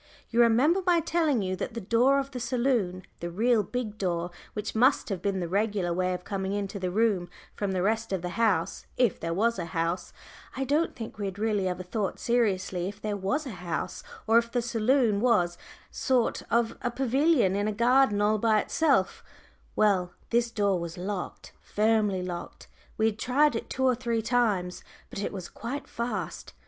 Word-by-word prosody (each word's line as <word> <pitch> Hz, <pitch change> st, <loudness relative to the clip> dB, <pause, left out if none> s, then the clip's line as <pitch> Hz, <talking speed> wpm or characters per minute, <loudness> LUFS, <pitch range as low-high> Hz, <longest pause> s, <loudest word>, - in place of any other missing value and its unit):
You 235 Hz, +1 st, +4 dB
remember 260 Hz, +11 st, +4 dB
my 355 Hz, -2 st, +4 dB
telling 315 Hz, -8 st, +1 dB
you 185 Hz, 0 st, -1 dB
that 225 Hz, -, -5 dB
the -, -, -2 dB
other 200 Hz, -, -11 dB
door 250 Hz, +4 st, +4 dB
of 275 Hz, 0 st, -2 dB
the 255 Hz, -, -5 dB
saloon, 235 Hz, -7 st, 0 dB, 0.2 s
the 170 Hz, -, -4 dB
real 225 Hz, +5 st, +2 dB
big 215 Hz, 0 st, -4 dB
door, 175 Hz, -2 st, -1 dB, 0.2 s
which 210 Hz, -, -4 dB
must 255 Hz, +4 st, +3 dB
have 195 Hz, -4 st, -3 dB
been 195 Hz, -2 st, -1 dB
the 175 Hz, -, -2 dB
regular 200 Hz, -1 st, 0 dB
way 185 Hz, +1 st, 0 dB
of 180 Hz, -, -8 dB
coming 195 Hz, 0 st, -3 dB
into 200 Hz, 0 st, -3 dB
the 185 Hz, -1 st, -2 dB
room 195 Hz, -3 st, +1 dB, 0.2 s
from 200 Hz, -2 st, -2 dB
the 185 Hz, -1 st, 0 dB
rest 220 Hz, +2 st, 0 dB
of 190 Hz, -3 st, -2 dB
the 180 Hz, -, -2 dB
house 200 Hz, -5 st, 0 dB
if 245 Hz, -7 st, +2 dB
there 165 Hz, -, -3 dB
was 230 Hz, +7 st, +1 dB
a -, -, -2 dB
house 165 Hz, +2 st, -1 dB, 0.5 s
I 270 Hz, -, 0 dB
don't 295 Hz, +5 st, +1 dB
think 225 Hz, -2 st, -8 dB
we 205 Hz, -, -2 dB
had 190 Hz, 0 st, -6 dB
really 210 Hz, -3 st, 0 dB
ever 185 Hz, 0 st, -3 dB
thought 195 Hz, +2 st, -2 dB
seriously 195 Hz, -6 st, 0 dB
if 200 Hz, +1 st, -10 dB
there 210 Hz, -1 st, -2 dB
was 205 Hz, +11 st, -1 dB
a 260 Hz, -, -5 dB
house, 175 Hz, -4 st, -4 dB, 0.2 s
or 225 Hz, +1 st, +6 dB
if 235 Hz, 0 st, -5 dB
the 245 Hz, -1 st, 0 dB
saloon 235 Hz, -1 st, +2 dB
was 210 Hz, -8 st, +3 dB
a -, -, -20 dB
sort 255 Hz, -3 st, +1 dB
of 235 Hz, -1 st, +1 dB, 0.2 s
pavilion 265 Hz, -, +3 dB
in 205 Hz, +1 st, 0 dB
a -, -, +1 dB
garden 235 Hz, -1 st, +3 dB
all 215 Hz, +1 st, +2 dB
by 220 Hz, -1 st, +3 dB
itself 275 Hz, -8 st, +1 dB, 0.5 s
well, 185 Hz, -4 st, +2 dB, 0.2 s
this 235 Hz, 0 st, +2 dB
door 200 Hz, -4 st, +1 dB
was 170 Hz, +1 st, -6 dB
locked, 185 Hz, +1 st, -5 dB
firmly 210 Hz, -3 st, +1 dB
locked; 175 Hz, -1 st, -7 dB, 0.3 s
we 220 Hz, -, +2 dB
had 220 Hz, -1 st, 0 dB
tried 285 Hz, +2 st, +3 dB
it -, -, -4 dB
two 265 Hz, -, -2 dB
or 255 Hz, -, +5 dB
three 235 Hz, -2 st, -1 dB
times, 210 Hz, -7 st, 0 dB, 0.3 s
but -, -, -6 dB
it -, -, -2 dB
was 185 Hz, -3 st, -6 dB
quite 275 Hz, +4 st, -6 dB
fast. 235 Hz, +1 st, -4 dB
215 Hz, 200 wpm, -28 LUFS, 190-240 Hz, 0.5 s, or